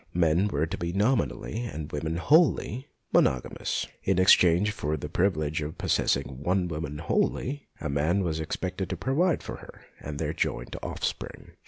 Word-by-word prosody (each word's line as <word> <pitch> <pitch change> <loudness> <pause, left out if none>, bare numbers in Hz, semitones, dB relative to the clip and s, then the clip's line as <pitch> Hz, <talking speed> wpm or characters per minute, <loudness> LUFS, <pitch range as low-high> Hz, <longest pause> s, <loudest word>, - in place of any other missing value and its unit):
Men 85 +3 +3
were 80 -6 0
to 85 +5 -5
be 85 0 -2
nominally, 115 +2 0 0.2
women 80 +2 -2
wholly, 140 - +3 0.3
monogamous. 65 -2 +1 0.2
In 95 -1 +1
exchange 95 +1 +5
for 75 -7 -2
the - - -5
privilege 80 -5 0
of 75 +1 -5
possessing 65 -1 0
one 90 +3 +1
woman 75 -3 -4
wholly, 130 - -1
a 75 - -3
man 75 +7 +1
was 80 -3 -1
expected 90 +4 -3
to 95 - -3
provide 140 - +1
for - - -6
her - - -13 0.2
and 75 -1 -6
their - - -2
joint - - -2
offspring. - - -4
85 Hz, 155 wpm, -27 LUFS, 75-100 Hz, 0.3 s, exchange